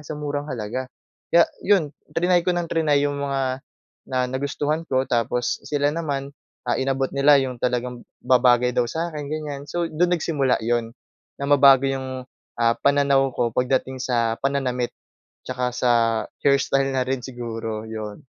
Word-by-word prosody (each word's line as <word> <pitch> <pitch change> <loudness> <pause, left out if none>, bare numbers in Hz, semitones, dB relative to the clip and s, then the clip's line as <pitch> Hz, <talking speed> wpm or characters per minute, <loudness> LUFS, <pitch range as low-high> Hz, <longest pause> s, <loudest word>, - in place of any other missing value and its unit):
sa 155 - -6
murang 145 -1 -3
halaga. 125 +2 -4 0.4
Kaya 170 0 +6 0.2
'yon, 185 -8 +3 0.2
triny 175 0 +3
ko 180 - +2
ng 175 -1 -1
triny 150 -3 +2
'yong 145 0 -3
mga 135 -2 -2 0.5
na 130 - 0
nagustuhan 145 +4 -2
ko 130 -1 +1
tapos 120 0 0
sila 145 -1 +1
naman, 140 -4 -3 0.4
ah, - - +1
inabot 135 0 0
nila 140 +1 +6
'yong 125 -2 -4
talagang 125 0 -1 0.2
babagay 125 -1 +4
daw 120 - +2
sa 165 +6 -3
akin, 150 -1 -5
ganyan. 150 -2 -4
So, 170 +3 -2
doon 175 +3 +2
nagsimula 140 -6 +1
'yon, 115 0 -1 0.4
na 140 - -3
mabago 140 -2 +7
'yong, 130 -1 -3 0.4
ah, 115 0 +4
pananaw 140 -1 +3
ko 120 -1 0
pagdating 130 +1 0
sa 115 -3 0
pananamit, 130 -3 0 0.6
tsaka 125 -1 -2
sa 125 -1 +2 0.5
hairstyle 135 -1 +2
na 130 - +2
rin 135 0 0
siguro, 115 -3 -5
'yon. 110 -2 -7
135 Hz, 155 wpm, -23 LUFS, 125-145 Hz, 0.6 s, mabago